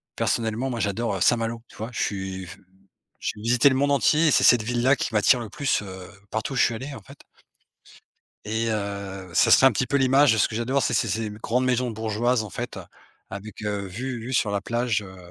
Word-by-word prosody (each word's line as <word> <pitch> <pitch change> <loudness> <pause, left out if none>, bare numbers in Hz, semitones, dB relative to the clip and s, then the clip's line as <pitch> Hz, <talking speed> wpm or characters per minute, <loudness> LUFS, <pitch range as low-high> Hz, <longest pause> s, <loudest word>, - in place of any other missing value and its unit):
personnellement, 115 +3 -1
moi 120 -2 -4
j'adore, 105 +1 -1
heu, 95 - -5
Saint-Malo. 115 0 +1
Tu - - -18
vois? 110 +3 -5
Je - - -3
suis, 95 -2 -3
f - - -11 0.6
j'ai 105 - -4
visité 120 +4 +3
le 130 - 0
monde 145 +2 +1
entier 150 +3 +3
et - - +4
c'est - - +3
cette 120 -3 +6
ville-là 120 +4 +2
qui 120 - -4
m'attire 110 +4 +4
le 115 -3 -6
plus, 140 -6 -1
heu, 95 -2 -9 0.2
partout 110 +5 -3
où - - -5
je 125 - +4
suis 115 - +2
allé 135 +5 -7
en - - -9
fait. 140 +1 -15 1.3
Et 110 +2 -1
heu, 100 -2 -5
ça - - +4
serait 135 - +7
un 135 - +7
petit 120 +4 -1
peu 140 - +1
l'image 135 0 +4
de - - 0
ce - - +3
que 110 - -7
j'adore, 130 +4 0
c'est - - 0
ces 115 - +1
ces 110 +3 -2
grandes 115 +4 -1
maisons 125 -1 0
bourgeoises 110 +2 0
en 105 - -8
fait, - - -6 0.5
avec, 100 +2 -9
heu, 100 -1 -2
vue 120 +6 -5
vue 125 +3 -6
sur 110 - +1
la 100 -1 -1
plage, 120 -1 -1
heu 95 -1 -11
115 Hz, 230 wpm, -24 LUFS, 105-125 Hz, 1.3 s, serait